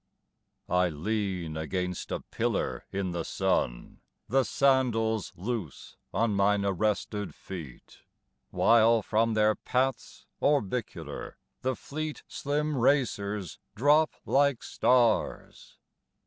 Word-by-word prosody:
I 90 0 +2
LEAN 90 -1 -2
against 90 +3 -3
a - - -2
pillar - - -2
in 95 -2 -2
the 85 -1 -2
sun, - - -1 0.3
The 135 +1 +3
sandals 120 -6 +1
loose 100 - -5 0.2
on 115 -2 +1
mine 100 0 +2
arrested 105 +1 -1
feet, 80 -10 -10 0.5
While 115 -1 +4
from 115 +1 +1
their 110 0 +4
paths 130 +3 -2 0.2
orbicular 125 -5 -1 0.2
the 130 0 0
fleet 155 +3 -5
Slim 150 +1 -2
racers 105 - 0 0.2
drop 150 +6 +4
like 140 -2 +2
stars. 120 -3 +1
110 Hz, 100 wpm, -29 LUFS, 95-130 Hz, 0.5 s, While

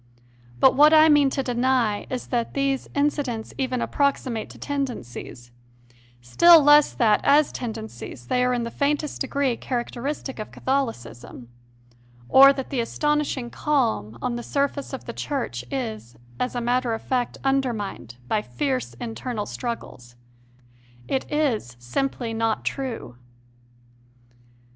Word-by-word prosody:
But 260 - +6
what 300 +3 +6
I 310 0 +7
mean 290 -2 +5
to 270 0 -2
deny 245 -4 0
is 255 -1 -5
that 235 -2 -2
these 275 -1 -1
incidents 285 -6 -1
even 255 -2 -1
approximate 270 -5 -1
to - - -13
tendencies 225 - -5 0.7
still 320 - +6
less 295 0 +6
that, 215 -4 +3
as 290 +1 +4
tendencies, 220 - -7
they 250 - +1
are 250 - +2
in 245 -1 0
the 230 - -5
faintest 295 +1 -1
degree 270 -2 0
characteristic 260 +2 -4
of 215 - -5
Catholicism 125 - -4 0.8
or 275 +1 +9
that 270 -1 -5
the 270 - -1
astonishing 285 0 -1
calm 225 - 0
on 240 - -1
the - - -5
surface 280 +2 -2
of 265 - -7
the 235 - -6
Church 235 - -3
is, 220 - -5 0.2
as 250 - -2
a 245 - -1
matter 245 0 0
of 225 - -9
fact, 250 -2 -1
undermined 240 - -2
by 215 - +1
fierce 265 +2 -3
internal 235 -2 -5
struggles. 165 - -6 0.9
It 265 - -2
is 250 - 0
simply 235 - -2
not 225 0 -1
true. 240 - -4
250 Hz, 135 wpm, -24 LUFS, 225-275 Hz, 0.9 s, or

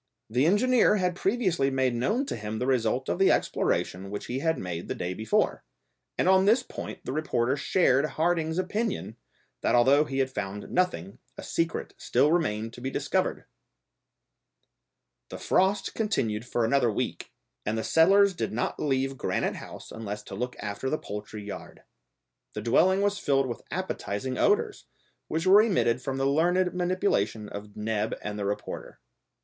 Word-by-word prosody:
The 125 +6 +3
engineer 225 +3 +4
had 180 -3 0
previously 185 - +1
made 130 -2 +1
known 210 - 0
to - - -4
him 105 0 -5
the 125 - -1
result 130 0 +1
of - - -1
the 195 - +5
exploration 95 +2 0
which 105 +1 -5
he 125 +2 -3
had 160 +2 +1
made 85 -2 -5
the - - -3
day 90 +1 -3
before, 110 +3 0 0.5
and - - +1
on 190 0 +5
this 230 +5 +4
point - - -8
the - - -3
reporter 130 -4 0
shared 140 -2 +2
Harding's 160 +1 0
opinion, 195 - -2 0.5
that - - +2
although 135 +5 +5
he 135 -2 -4
had 130 -1 +1
found 105 -3 -5
nothing, 100 - -1 0.2
a - - -7
secret 165 0 -2
still 150 - +2
remained 115 -10 0
to 120 - -11
be 130 - -2
discovered! - - -1 1.8
The - - -6
frost 195 +2 +1
continued 120 - -1
for 120 -1 0
another 120 -1 +3
week, - - -3 0.3
and 110 +2 -1
the 110 - -1
settlers 195 +4 +5
did 175 - -3
not 120 +2 -2
leave 135 -1 0
Granite - - -1
House - - -10
unless 105 -1 -6
to - - -10
look 125 +5 -3
after 105 +6 -4
the 155 - 0
poultry 105 -2 -7
yard. 100 - -9 0.7
The - - -5
dwelling 185 +11 +3
was 205 0 +1
filled 135 -5 +2
with 120 - -5
appetising 130 - -3
odours, 420 0 +1 0.4
which 160 +1 -2
were 195 +3 +8
emitted 170 - +1
from 135 +1 -3
the 135 - 0
learned 175 +6 +2
manipulation 175 - 0
of 100 0 -9
Neb 105 0 -1
and 105 0 -4
the 100 - -2
reporter. 100 +1 -5
135 Hz, 165 wpm, -27 LUFS, 110-180 Hz, 1.8 s, were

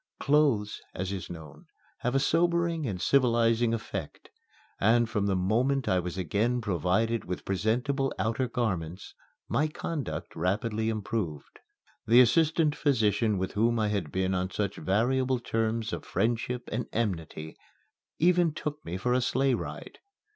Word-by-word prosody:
Clothes, 140 -8 +2
as 95 +1 -3
is 95 -2 -5
known, 80 -4 -10 0.3
have 125 +2 -1
a - - +4
sobering 170 0 +1
and 95 -5 -3
civilizing 115 -2 +3
effect, 100 -8 -5 0.5
and 115 +3 +4
from 105 -3 -1
the 95 - +1
very 90 0 -1
moment 130 +6 +1
I 90 - +3
was 90 +1 -4
again 105 +8 0
provided 105 +2 0
with 90 - -5
presentable 125 - 0
outer 115 +4 0
garments 95 -7 -3 0.3
my 150 - +1
conduct 155 -1 -5
rapidly 105 +5 0
improved. 105 - -4 0.5
The 120 +3 +7
assistant 155 +5 +4
physician 110 -6 +2
with 95 0 -2
whom 115 +3 +2
I 110 -1 +1
had 100 -8 -2
been 95 0 0
on 90 0 -1
such 100 0 -2
variable 130 +6 +1
terms 115 -1 -1
of - - -4
friendship 120 +2 -1
and 120 +2 -2
enmity 80 -8 -3 0.6
even 175 -1 +3
took 150 0 -5
me 85 +2 -4
for 125 +6 0
a 130 - +2
sleigh 130 +2 +2
ride. - - -6
115 Hz, 145 wpm, -28 LUFS, 95-130 Hz, 0.6 s, The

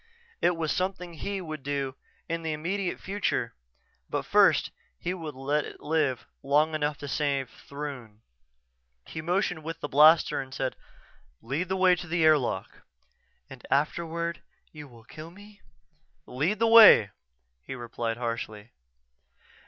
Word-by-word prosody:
It 175 - +3
was 160 -2 -1
something 180 -2 -3
he 195 +4 -4
would 155 -4 -7
do 140 -1 -3 0.3
in 165 0 -3
the 160 -1 -2
immediate 180 +5 -3
future 190 - -2 0.6
but - - -2
first - - +4 0.3
he 180 - -3
would 160 -6 -7
let 145 +3 -1
it - - -10
live 150 -5 -1 0.2
long 150 +3 +2
enough 150 -1 -1
to 145 - -8
save 140 -2 -1
Throon. 135 -7 -9 0.8
He 160 - -7
motioned 175 -1 -1
with 165 +1 -6
the - - -4
blaster 150 +2 +5
and 130 -1 -10
said, 130 -1 -2 0.6
"Lead 140 +10 -3
the 190 - 0
way 185 -1 +5
to 175 0 -8
the 170 0 0
airlock." 140 -11 +1 0.7
"And - - -13
afterward 170 +4 -1 0.3
you 150 -2 -10
will 120 -3 -17
kill 155 +7 -11
me?" 205 +3 -16 0.6
"Lead 155 +12 -1
the 230 - +2
way," 220 - +9 0.5
he 130 - -7
repeated 120 -1 -4
harshly. 115 -2 -5
155 Hz, 145 wpm, -27 LUFS, 135-175 Hz, 0.8 s, way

